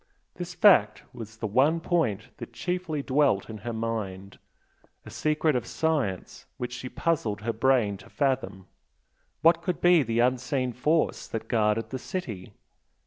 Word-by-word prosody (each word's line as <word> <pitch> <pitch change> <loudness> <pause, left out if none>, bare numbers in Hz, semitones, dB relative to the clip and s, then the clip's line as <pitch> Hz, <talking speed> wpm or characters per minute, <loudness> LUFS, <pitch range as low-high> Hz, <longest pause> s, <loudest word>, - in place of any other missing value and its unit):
This - - -7
fact - - +5
was 115 -1 -9
the 110 - -4
one 135 +10 +3
point 150 - -1
that - - -9
chiefly 175 -5 -3
dwelt 130 -7 +1
in 110 - -8
her 120 - -5
mind 105 -4 -4 0.7
a - - -10
secret 155 -1 +1
of 125 - -2
science 145 - -2
which 125 0 -4
she 125 0 -6
puzzled 115 - -1
her 115 +1 -2
brain 115 -4 +2
to - - -16
fathom. 105 -9 -1 0.8
What 165 +1 +5
could 180 -3 -2
be 175 -2 +5
the 115 -3 -2
unseen 125 +1 +1
force 155 +7 0
that 115 0 -5
guarded 110 -1 +1
the 130 - -4
city? 115 - -6
125 Hz, 150 wpm, -27 LUFS, 110-150 Hz, 0.8 s, fact